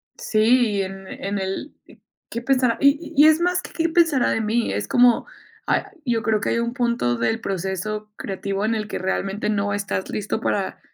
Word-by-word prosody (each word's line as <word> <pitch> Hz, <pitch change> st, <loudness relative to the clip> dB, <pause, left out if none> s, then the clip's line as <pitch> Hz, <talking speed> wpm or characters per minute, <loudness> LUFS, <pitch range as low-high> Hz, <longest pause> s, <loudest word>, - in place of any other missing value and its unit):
Sí, 220 Hz, 0 st, +2 dB
y 195 Hz, -, +2 dB
en 195 Hz, 0 st, -8 dB
en 200 Hz, +1 st, -4 dB
el 190 Hz, +9 st, -4 dB, 0.6 s
¿Qué 235 Hz, -, -4 dB
pensará? 255 Hz, -2 st, +2 dB
Y 280 Hz, +4 st, +2 dB
y 295 Hz, +2 st, +7 dB
es 315 Hz, 0 st, +5 dB
más 360 Hz, +1 st, +1 dB
que: -, -, -10 dB
"Qué 330 Hz, 0 st, 0 dB
pensará 325 Hz, -6 st, +3 dB
de 225 Hz, -, 0 dB
mí". 225 Hz, +2 st, 0 dB
Es -, -, -2 dB
como 245 Hz, -1 st, +4 dB, 0.4 s
Ay, -, -, +1 dB, 0.2 s
yo 235 Hz, -1 st, 0 dB
creo 220 Hz, -1 st, +2 dB
que -, -, -2 dB
hay 230 Hz, -, +1 dB
un 235 Hz, +1 st, -2 dB
punto 235 Hz, -, 0 dB
del 225 Hz, -, 0 dB
proceso 195 Hz, +2 st, -3 dB
creativo, 195 Hz, 0 st, -4 dB
en 220 Hz, +1 st, +1 dB
el 215 Hz, -1 st, -2 dB
que -, -, -4 dB
realmente, 195 Hz, +2 st, -2 dB
no 200 Hz, -1 st, 0 dB
estás 200 Hz, -2 st, -3 dB
listo 215 Hz, +1 st, -2 dB
para 200 Hz, -4 st, -2 dB
220 Hz, 200 wpm, -22 LUFS, 200-245 Hz, 0.6 s, y